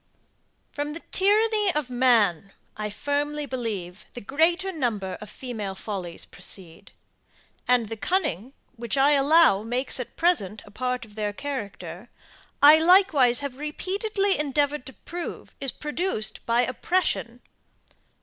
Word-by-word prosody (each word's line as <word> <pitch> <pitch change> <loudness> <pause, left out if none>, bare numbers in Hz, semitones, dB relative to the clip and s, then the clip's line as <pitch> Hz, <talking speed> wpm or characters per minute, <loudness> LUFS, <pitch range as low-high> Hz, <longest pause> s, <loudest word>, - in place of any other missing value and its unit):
>From 295 +1 -4
the 335 - -7
tyranny 420 +1 +3
of 300 -4 -2
man, 220 -8 +2 0.2
I 210 0 -4
firmly 290 +6 -2
believe, 215 -7 -5
the - - -5
greater 340 - +1
number 215 - -2
of 215 - -9
female 215 -7 -6
follies 190 -4 -5
proceed; 185 +1 -7 0.8
and 245 -3 +3
the 225 - -5
cunning, 265 - -1 0.2
which 235 +3 -2
I 275 +2 +5
allow, 285 -6 +5
makes 245 +4 0
at 250 - -6
present 220 - +1
a 205 - -15
part 250 +2 -3
of 210 - -18
their 210 -1 -3
character, 205 - -6 0.5
I 300 +2 +9
likewise 320 -8 +5
have 280 -2 -6
repeatedly 390 +6 -1
endeavoured 290 -1 0
to 265 - -8
prove, 345 +6 -8
is 270 -2 +3
produced 300 - -3
by 235 +1 +3
oppression. 255 -3 -1
255 Hz, 130 wpm, -25 LUFS, 215-305 Hz, 0.8 s, I